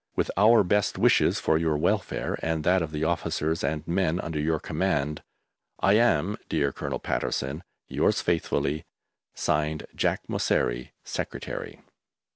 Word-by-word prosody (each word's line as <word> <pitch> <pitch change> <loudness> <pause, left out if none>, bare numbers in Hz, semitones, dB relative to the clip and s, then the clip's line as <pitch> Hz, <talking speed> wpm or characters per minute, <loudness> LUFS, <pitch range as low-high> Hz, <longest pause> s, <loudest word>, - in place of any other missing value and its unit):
With - - 0
our 110 +3 +6
best 100 +2 +1
wishes - - +4
for 80 - +2
your 80 -2 +1
welfare 75 - 0
and 80 -1 -1
that 90 +2 +3
of 80 - -2
the 75 0 -3
officers 80 0 -1
and 80 -1 -2
men 90 -1 +1
under 80 -3 -3
your 80 +1 +1
command, 75 -4 -1 0.6
I 100 - +4
am, 105 -4 +3
dear 70 -1 +1
Colonel - - -4
Patterson, 70 +6 -2 0.2
Yours - - +1
faithfully, 75 +2 0 0.5
(Signed) 75 0 0
JACK - - 0
MOSSERI, - - 0
Secretary. - - -5
80 Hz, 135 wpm, -27 LUFS, 75-90 Hz, 0.6 s, our